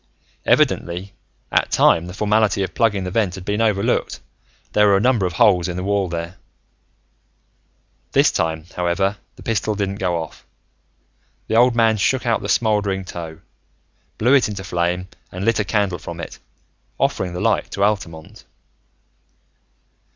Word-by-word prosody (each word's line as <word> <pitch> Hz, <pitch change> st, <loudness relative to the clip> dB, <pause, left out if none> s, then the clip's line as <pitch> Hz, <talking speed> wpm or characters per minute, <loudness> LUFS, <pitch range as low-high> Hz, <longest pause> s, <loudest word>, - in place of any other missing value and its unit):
Evidently, 90 Hz, +3 st, +1 dB, 0.4 s
at -, -, +2 dB
time 85 Hz, +1 st, +3 dB
the 90 Hz, -, -7 dB
formality 105 Hz, -1 st, +2 dB
of 95 Hz, -, -5 dB
plugging 105 Hz, -4 st, +1 dB
the 90 Hz, -, -4 dB
vent 100 Hz, -3 st, 0 dB
had 95 Hz, -2 st, -9 dB
been 105 Hz, +2 st, -1 dB
overlooked: 105 Hz, -3 st, 0 dB, 0.5 s
there 105 Hz, 0 st, +5 dB
were 100 Hz, -1 st, +5 dB
a -, -, +1 dB
number 115 Hz, -4 st, +2 dB
of 90 Hz, -, -6 dB
holes 90 Hz, -3 st, +4 dB
in 90 Hz, -1 st, -4 dB
the 90 Hz, -, -3 dB
wall 100 Hz, -1 st, 0 dB
there. 85 Hz, +2 st, -5 dB, 1.7 s
This -, -, +4 dB
time, 80 Hz, -1 st, -2 dB
however, 95 Hz, +3 st, 0 dB, 0.2 s
the -, -, -14 dB
pistol 110 Hz, -1 st, -1 dB
didn't 100 Hz, -1 st, -2 dB
go 90 Hz, -2 st, 0 dB
off. 80 Hz, -1 st, -8 dB, 1.0 s
The 110 Hz, -, -2 dB
old 120 Hz, +1 st, +5 dB
man 115 Hz, -2 st, +3 dB
shook 130 Hz, +6 st, +1 dB
out 115 Hz, -1 st, +1 dB
the -, -, -5 dB
smoldering 105 Hz, -4 st, +1 dB
tow, 80 Hz, -3 st, -8 dB, 0.8 s
blew 120 Hz, +5 st, +3 dB
it 135 Hz, -7 st, +5 dB
into 100 Hz, -2 st, -6 dB
flame, 90 Hz, 0 st, -1 dB, 0.2 s
and 90 Hz, +2 st, -5 dB
lit 115 Hz, -1 st, +2 dB
a -, -, +2 dB
candle 100 Hz, -4 st, 0 dB
from 85 Hz, +1 st, -8 dB
it, -, -, -8 dB, 0.6 s
offering 90 Hz, -2 st, 0 dB
the 90 Hz, -, -4 dB
light -, -, +1 dB
to 100 Hz, -, -1 dB
Altamont. 85 Hz, -6 st, -2 dB
95 Hz, 160 wpm, -20 LUFS, 90-105 Hz, 1.7 s, there